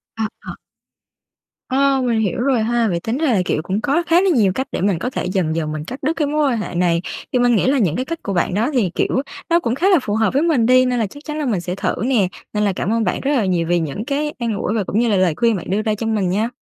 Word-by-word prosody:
Ờ, 220 -1 -1
ờ. - - -8 1.1
Ờ, 270 +1 +2
mình 230 -2 +1
hiểu 215 +2 -1
rồi 255 -3 +2
ha. 235 0 +1
Vậy 170 -3 -1
tính 225 +8 -3
ra 300 -6 +1
là, 190 - +2
kiểu, 155 - 0
cũng 190 +5 -2
có 295 +4 +1
khá 345 +2 +4
là 390 - +2
nhiều 220 - +3
cách 265 0 -2
để - - -3
mình 190 -4 +1
có 250 - -2
thể - - -4
dần 180 -4 -1
dần 155 -2 -2
mình 155 0 -5
cắt 260 +8 -8
đứt 305 +4 +1
cái 300 - +1
mối 300 +1 +1
quan 235 - 0
hệ 210 - -5
này. 170 -1 +2 0.3
Thì 250 - +3
mình 245 -1 +3
nghĩ 215 - +2
là 275 - +3
những 175 -7 +1
cái 255 - -2
cách 335 +2 -5
của 200 - -3
bạn 175 - 0
đó 225 +8 +1
thì, 225 -8 +2
kiểu, 260 - +1 0.3
nó 340 +1 +4
cũng 240 -6 -1
khá 360 +8 +2
là 365 -6 +5
phù 210 -4 -2
hợp 220 +1 +1
với 280 - +2
mình 295 -9 +2
đi, 255 +1 +5
nên 250 -1 0
là 220 - 0
chắc 285 +9 -13
chắn 305 0 -4
là 300 - -1
mình 205 -8 0
sẽ 180 +1 -4
thử - - -1
nè. 235 -8 +2 0.3
Nên 210 0 0
là 200 -2 +1
cảm 210 +5 -1
ơn 230 - +1
bạn 180 - -1
rất 280 - 0
là 240 -8 +2
nhiều 170 -3 0
vì 175 0 +2
những 165 - -4
cái 295 +1 -2
an 235 -2 -1
ủi 210 - -2
và 215 - 0
cũng 210 - -1
như 235 -1 +2
là 200 - +2
lời 185 -4 +2
khuyên 230 -2 +2
bạn 180 - -6
đưa 205 +3 +1
ra 215 -1 0
cho 225 +1 -4
mình 205 -5 0
nha. 215 +5 0
225 Hz, 315 wpm, -19 LUFS, 190-265 Hz, 1.1 s, là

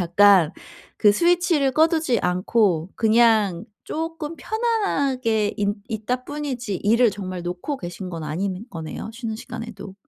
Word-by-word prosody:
약간 180 -1 +5 0.5
그 210 -2 +6
스위치를 340 - +2
꺼두지 315 - +2
않고 180 -1 +1
그냥 220 -5 +3 0.2
쪼끔 325 0 -4
편안하게 280 - 0
인 205 0 +1
있다 245 +4 -3
뿐이지 260 -9 -4
일을 230 +3 +3
정말 185 -2 -6
놓고 180 +11 -4
계신 180 +1 -6
건 165 -2 -5
아닌 185 +6 -3
거네요 160 +6 -6
쉬는 225 -3 -4
시간에도. 225 -4 -8
220 Hz, 275 characters per minute, -23 LUFS, 185-275 Hz, 0.5 s, 그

